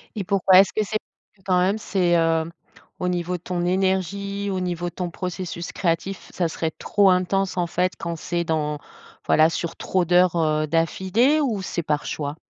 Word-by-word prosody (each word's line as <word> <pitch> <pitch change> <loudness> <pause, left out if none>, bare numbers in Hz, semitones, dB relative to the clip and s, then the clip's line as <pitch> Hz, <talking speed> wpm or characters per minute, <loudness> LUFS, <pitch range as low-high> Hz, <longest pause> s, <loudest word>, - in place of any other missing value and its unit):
Et 205 - -2
pourquoi? 190 -1 +5
Est-ce 195 0 +4
que 215 - +1
c'est 215 +2 -1 0.5
quand 185 -2 +3
même 190 +4 +2
c'est, 180 -5 +1
heu, 165 -1 +2 0.6
au 180 - -1
niveau 180 0 -2
de - - -21
ton 175 -1 -2
énergie, 195 +2 -1
au 190 - -1
niveau 175 -1 -2
de - - -21
ton 180 -2 -3
processus 180 -1 -5
créatif, 185 +2 -2
ça 175 - 0
serait 160 0 -2
trop 200 +5 +2
intense 185 +1 +1
en 175 -1 +1
fait 180 +2 0
quand 170 0 -4
c'est 170 +2 -2
dans 150 -2 -1 0.5
voilà 155 +1 +5
sur 170 0 -4
trop 185 -2 0
d'heures, 180 +1 +4
heu, 155 -1 +1
d'affilée 190 - +2
ou 230 -9 -1
c'est 170 -2 -3
par 150 -1 -1
choix? 145 -1 -4
180 Hz, 185 wpm, -23 LUFS, 165-190 Hz, 0.6 s, pourquoi